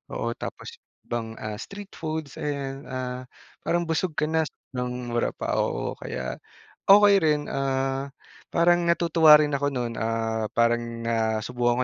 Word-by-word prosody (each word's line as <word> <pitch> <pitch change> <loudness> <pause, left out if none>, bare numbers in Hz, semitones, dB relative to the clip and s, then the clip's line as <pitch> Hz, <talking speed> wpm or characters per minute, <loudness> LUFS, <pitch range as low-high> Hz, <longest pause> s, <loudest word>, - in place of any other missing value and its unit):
Oo, 115 - -1
tapos - - -8 0.3
ibang, 115 -1 -4
ah, 105 -1 -5
street 200 0 -9
foods, 155 -3 -5
ayan. 140 -1 -4
Ah, 130 -1 -4 0.3
parang 175 0 +1
busog 160 0 -1
ka - - 0
na 160 -1 +2
s - - -14 0.2
ng 125 -1 -3
mura 120 - +1
pa, - - -1
oo. - - -1
Kaya, 65 0 -5 0.5
okey 205 0 +8
rin, 150 -2 +3
ah, 135 0 -1 0.4
parang 175 +1 +4
natutuwa 165 -2 +6
rin 150 -1 0
ako 145 +1 +1
nun. 120 -2 -2
Ah, 110 -1 -1
parang 115 0 +4 0.3
nasubukan 115 +2 +1
135 Hz, 145 wpm, -26 LUFS, 120-155 Hz, 0.5 s, okey